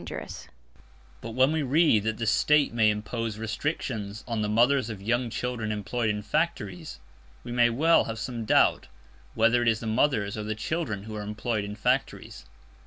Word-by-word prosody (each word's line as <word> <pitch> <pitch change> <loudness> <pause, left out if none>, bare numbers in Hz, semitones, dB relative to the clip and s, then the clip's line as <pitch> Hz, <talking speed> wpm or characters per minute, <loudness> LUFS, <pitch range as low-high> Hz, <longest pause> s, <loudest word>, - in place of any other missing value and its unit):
But 115 - -7
when 130 +3 +4
we 160 0 0
read 140 -6 +3
that 110 0 -1
"the 115 - -3
State 145 +4 +3
may 110 -2 +4
impose 110 +1 -3
restrictions 110 -3 -4
on 115 -3 -2
the 105 - -1
mothers 120 +3 +3
of 105 -3 -6
young 120 +4 -1
children 115 -2 -3
employed 110 +2 -2
in 105 0 -2
factories," 160 +6 -2 0.5
we - - -7
may 120 0 +4
well 160 +8 +3
have 115 0 -5
some 120 0 -4
doubt 110 - +3 0.5
whether 120 +1 +3
it 120 - 0
is 110 -1 +2
the - - -7
mothers 110 -3 +1
or 110 - -4
the 110 +1 -3
children 110 -4 -3
who 110 0 -8
are 105 - -4
employed 105 +1 -3
in 100 0 -6
factories. 120 - -2
115 Hz, 175 wpm, -27 LUFS, 105-125 Hz, 0.5 s, when